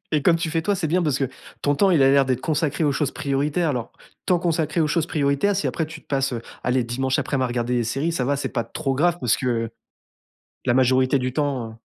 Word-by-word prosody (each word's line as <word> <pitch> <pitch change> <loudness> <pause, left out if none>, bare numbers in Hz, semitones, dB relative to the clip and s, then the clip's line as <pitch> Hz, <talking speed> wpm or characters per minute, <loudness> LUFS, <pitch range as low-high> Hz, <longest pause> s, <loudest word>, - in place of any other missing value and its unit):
et 150 -2 +2
comme 170 +1 +4
tu 165 0 -2
fais, 165 +1 0
toi, 205 +4 +1
c'est 180 -4 -2
bien 175 +4 +1
parce 150 -5 0
que 135 - +1 0.4
ton 145 0 +1
temps, 195 +4 +3
il 160 -6 +4
a 135 - +6
l'air 140 0 +5
d'être 130 -1 -1
consacré 155 0 0
aux 145 - +2
choses 145 0 0
prioritaires. 145 +4 -1
Alors, 125 -5 -3 0.3
temps 180 -1 +2
consacré 165 -2 0
aux 155 - +3
choses 160 +1 0
prioritaires, 145 +6 +1
si 200 - -1
après, 160 - -1
tu 160 0 -10
te - - -31
passes, 135 -1 0
heu, 120 - -3 0.2
allez, 125 +1 +1
dimanche 130 +2 -1
aprem, 135 -2 0
à - - +2
regarder 120 0 -1
des 120 -1 +1
séries, 135 +9 -1
ça 135 -6 -1
va, 140 +2 +1
c'est 140 - -3
pas 115 -3 -2
trop 135 +4 -3
grave 175 +5 +2
parce 120 -3 +2
que, 115 -3 -1 0.9
la 120 - +2
majorité 130 +1 +3
du 130 0 -2
temps, 135 -5 -1
heu - - -11
140 Hz, 260 wpm, -23 LUFS, 130-160 Hz, 0.9 s, a